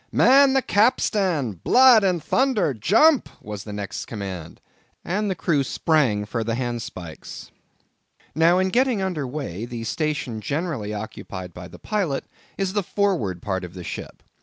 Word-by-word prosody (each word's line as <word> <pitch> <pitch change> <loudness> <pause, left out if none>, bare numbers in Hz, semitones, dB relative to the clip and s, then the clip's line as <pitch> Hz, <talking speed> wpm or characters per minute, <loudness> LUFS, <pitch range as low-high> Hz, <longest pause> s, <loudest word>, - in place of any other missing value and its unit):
"Man 275 +1 +6
the 270 -1 +2
capstan! 200 - +2
Blood 250 -4 +6
and 180 -4 +1
thunder!—jump!"—was 185 - +2
the 105 - -7
next 100 -1 -5
command, 95 -7 -7 0.5
and 205 +4 -1
the 190 - -1
crew 155 -4 +1
sprang 130 -8 +1
for 115 +2 -3
the 115 +1 -2
handspikes. 115 -9 -6 0.8
Now 165 +4 +4
in 190 0 +2
getting 250 +1 +2
under 165 -8 -2
weigh, 125 - -5
the 120 -1 -6
station 135 -3 -2
generally 145 - -3
occupied 100 -4 -7
by 90 +1 -9
the - - -13
pilot 190 -10 -2 0.3
is 195 -1 -1
the 205 - +1
forward 170 - -1
part 95 -3 -2
of 90 0 -9
the 90 - -7
ship. - - -8
145 Hz, 145 wpm, -23 LUFS, -, 0.8 s, Man